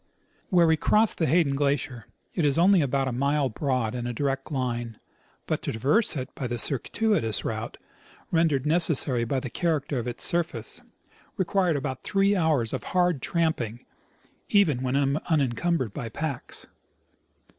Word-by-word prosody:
Where 175 -3 +5
we 160 -1 +3
crossed 215 +7 +2
the 160 - +2
Hayclen 160 -4 +3
glacier 135 -5 -1 0.3
it 175 - -1
is 145 -1 +2
only 185 +1 +5
about 135 -1 0
a - - -1
mile 140 +2 +1
broad 125 -2 -1
in 120 -1 -3
a 120 - -3
direct 135 +3 -2
line; 120 -4 -3 0.5
but - - -2
to - - -3
traverse 145 - +1
it 130 -2 -5
by 130 - -4
the 120 0 -3
circuitous 135 - 0
route 110 0 -4 0.5
rendered 160 -5 +2
necessary 150 -7 +3
by 130 +3 -1
the 130 -2 -6
character 150 -5 -1
of 120 - -4
its 120 - -5
surface 165 -10 -2 0.6
required 185 -2 +1
about 130 -2 -3
three 195 +1 +2
hours 155 - +1
of - - -4
hard 175 -6 +2
tramjjing, 130 -10 -1 0.6
even 165 -11 +3
when 130 0 -1 0.3
unincumbered 140 - 0
with 115 -3 -5
packs. 150 -5 -4
140 Hz, 155 wpm, -26 LUFS, 125-165 Hz, 0.6 s, Where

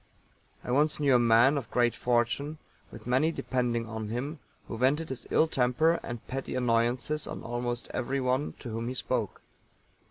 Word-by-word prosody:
I - - -4
once 150 +4 +2
knew 140 -3 +3
a 125 - +6
man 120 +5 +5
of 115 - -10
great 120 -1 +2
fortune, 125 +5 0 0.3
with - - -11
many 130 +6 +2
depending 120 -6 -1
on 110 -1 -5
him, 140 +7 -4 0.3
who - - -5
vented 135 +7 +1
his 130 -2 -6
ill 160 - +4
temper 155 +5 +2
and 120 -2 -7
petty 135 0 -4
annoyances 125 +5 0
on - - -6
almost 120 0 -3
everyone 130 +2 0
to 120 - -6
whom 115 +1 -3
he 130 - -3
spoke. - - -2
125 Hz, 165 wpm, -29 LUFS, 120-140 Hz, 0.3 s, a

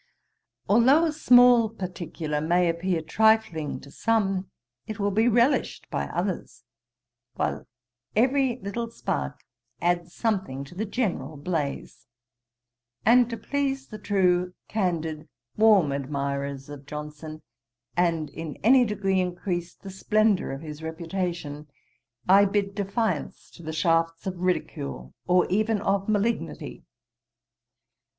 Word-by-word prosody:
Though 260 +10 +5
a 320 - +1
small 245 -6 +6
particular 170 -6 -4
may 175 +3 +2
appear 170 0 -1
trifling 220 -4 +2
to 140 - -13
some, 195 -3 0 0.4
it 215 - -5
will 200 0 +1
be 220 +4 +3
relished 245 +4 +2
by - - -2
others; 180 - -4 0.7
while - - -2 0.5
every 255 +2 +2
little 230 +4 -3
spark 230 - -4 0.4
adds 175 0 0
something 190 - -1
to 140 - -12
the 210 +5 -3
general 175 - -2
blaze: 145 -2 -4 1.0
and 240 +2 +6
to 230 - -4
please 275 0 -2
the 215 - -8
true, 180 -3 +1
candid, 165 -6 -2 0.3
warm 210 -9 +5
admirers 140 0 -3
of 145 -1 -10
Johnson, 150 +1 -7 0.5
and 165 -3 +1
in 160 -2 -6
any 250 +3 +6
degree 195 -3 0
increase 175 -1 -3
the 195 - -10
splendour 215 +1 +2
of 135 +1 -6
his 155 -1 -8
reputation, 165 -2 -4 0.6
I 195 +2 +7
bid 200 0 0
defiance 205 +3 -2
to - - -14
the 160 -1 -5
shafts 165 +1 +1
of 185 -2 -4
ridicule, 70 - -3
or 180 0 +4
even 215 +2 +2
of 195 0 0
malignity. 215 +2 -2
185 Hz, 120 wpm, -26 LUFS, 160-220 Hz, 1.0 s, I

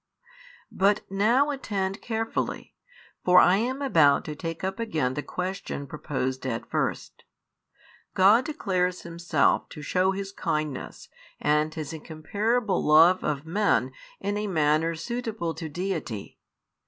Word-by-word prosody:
But 200 +2 +2
now 235 +9 +3
attend 200 -8 -3
carefully, 225 -1 -3 0.5
for 180 0 +5
I 180 +2 +5
am 260 +6 -2
about 150 - +4
to 150 - -5
take 165 +3 -6
up 190 +3 -3
again 155 - -1
the 145 - -3
question 185 -4 -4
proposed 130 -3 -3
at 115 -3 -3
first. - - -3 0.9
God 205 +6 +5
declares 185 - -1
Himself 170 -3 +1
to 150 - -9
shew 185 +5 +1
His 195 0 -5
kindness 150 -7 -3 0.3
and 150 +1 +2
His 155 -1 -6
incomparable 200 +8 -1
love 165 +5 +6
of 145 -2 -1
|5 - - -23
men 200 +6 +1 0.3
in 205 +1 -2
a 210 - -2
manner 160 -1 +2
suitable 220 -3 -3
to 160 -1 -6
Deity. 160 - -4
180 Hz, 130 wpm, -26 LUFS, 155-205 Hz, 0.9 s, love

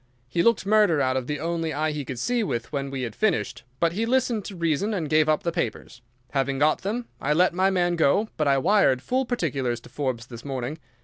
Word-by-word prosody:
He 170 +7 0
looked 230 0 +3
murder 210 -6 +4
out 130 -1 +1
of 130 -1 -2
the 150 -1 -2
only 165 0 -2
eye 155 +2 0
he 150 -1 -4
could 130 -2 -6
see 245 - 0
with 120 - -3
when 140 -2 -2
we 135 -1 -4
had 115 -3 -5
finished, 180 - 0 0.2
but 165 +2 +2
he 225 +5 -1
listened 245 -4 +1
to 200 - -7
reason 170 +5 0
and 165 -5 -2
gave 155 +1 +3
up 155 - +2
the 170 - 0
papers. 120 -6 -4 0.3
Having 135 -1 0
got 150 +2 +2
them 230 +5 -3 0.2
I 150 - +1
let 180 +3 +3
my 190 +2 +3
man 175 -2 +1
go, 165 +8 +3
but 155 - 0
I 140 -1 +4
wired 135 -5 +3
full 260 0 0
particulars 135 - -1
to - - -15
Forbes 130 -5 -3
this 120 -2 -10
morning. 135 +2 -4
155 Hz, 235 wpm, -25 LUFS, 135-195 Hz, 0.3 s, murder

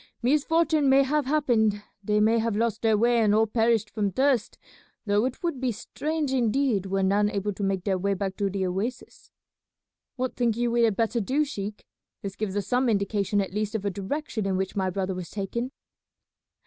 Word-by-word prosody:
Misfortune 305 +2 +2
may 270 +1 +6
have 290 0 0
happened; 230 -8 +2 0.2
they 210 +1 +1
may 225 +2 +4
have 225 -1 0
lost 225 0 0
their 220 -2 +3
way 235 +2 +3
and 210 -2 +3
all 220 +1 +4
perished 225 0 +1
from 210 -2 0
thirst, 260 +1 +1 0.5
though 205 +2 +2
it 255 +5 -4
would 335 -7 -2
be 255 -2 +1
strange 295 +6 -3
indeed 240 -4 +1
were 195 0 0
none 205 +2 +3
able 205 0 -2
to 195 - -8
make 195 -2 0
their 190 -2 0
way 200 +2 0
back 190 0 -3
to 200 -1 0
the 190 0 -2
oasis." 205 +8 -4 0.9
"What 255 -1 -3
think 235 -3 +1
you 240 0 0
we 235 0 +4
had 220 -3 +1
better 230 +1 0
do, 275 +9 +1
sheik? 210 -6 -6 0.4
This 195 -1 -5
gives 205 -2 -3
us 205 -2 -1
some 250 +4 +1
indication 200 -1 +1
at 190 -2 -5
least 215 +1 -2
of 205 -2 -2
a 200 - +1
direction 215 +2 -3
in 190 -1 0
which 190 0 -2
my 190 -2 0
brother 190 0 -2
was 180 -2 -6
taken." 235 +5 -3
215 Hz, 200 wpm, -26 LUFS, 200-250 Hz, 0.9 s, may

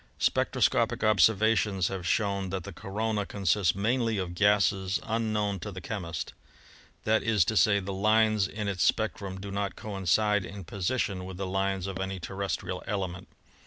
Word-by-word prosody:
"Spectroscopic 115 0 +1
observations 105 -2 +3
have 95 -3 -4
shown 100 -1 0
that 95 -1 -3
the 100 - -8
corona 105 +4 -2
consists 95 -2 +1
mainly 115 +2 +1
of 90 -2 -3
gases 100 -1 +2
unknown 105 -3 -1
to 105 +5 -6
the 95 - -7
chemist. 90 -4 -5 0.7
That 110 +1 +2
is 105 -6 +3
to 110 - -1
say, 100 -1 +4
the 100 0 -5
lines 110 0 +3
in 105 +1 -4
its 95 -3 -2
spectrum 100 -4 0
do 100 +1 -7
not 100 -2 -2
coincide 105 +1 +1
in 100 +1 -8
position 95 +1 -2
with 95 0 -7
the 95 - -3
lines 95 0 -1
of 95 -1 -4
any 95 0 -3
terrestrial 95 0 -4
element. 95 -3 -3
100 Hz, 160 wpm, -28 LUFS, 95-105 Hz, 0.7 s, say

